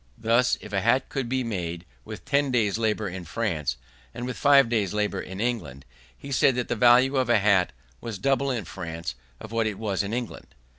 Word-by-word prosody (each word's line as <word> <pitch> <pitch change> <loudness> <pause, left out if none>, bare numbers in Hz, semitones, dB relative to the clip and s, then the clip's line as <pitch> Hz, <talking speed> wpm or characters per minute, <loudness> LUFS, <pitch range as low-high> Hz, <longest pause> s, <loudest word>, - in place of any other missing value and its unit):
Thus, 120 +2 +2
if 105 - -10
a 100 - +1
hat 120 +5 +2
could 135 -4 -3
be 130 0 0
made 85 -6 -4 0.2
with - - -9
ten 140 0 +1
days' 110 -4 +1
labour 110 -2 0
in 90 0 -6
France 85 - -2 0.4
and 120 - -4
with 125 -1 -4
five 140 -3 +5
days' 105 -4 0
labour 105 -2 -1
in 95 +1 -8
England, 100 - -3 0.3
he 140 - -9
said 130 -1 +3
that 125 - -2
the - - 0
value 125 +4 +5
of 130 -2 +1
a 120 - +5
hat 100 -3 +3 0.3
was 115 -3 -6
double 135 +6 +1
in 120 -7 -2
France 85 -2 -6 0.3
of 110 - -10
what 115 -1 +1
it 105 -3 -3
was 100 -4 -1
in 100 0 -4
England. 120 0 -5
110 Hz, 210 wpm, -26 LUFS, 95-125 Hz, 0.4 s, five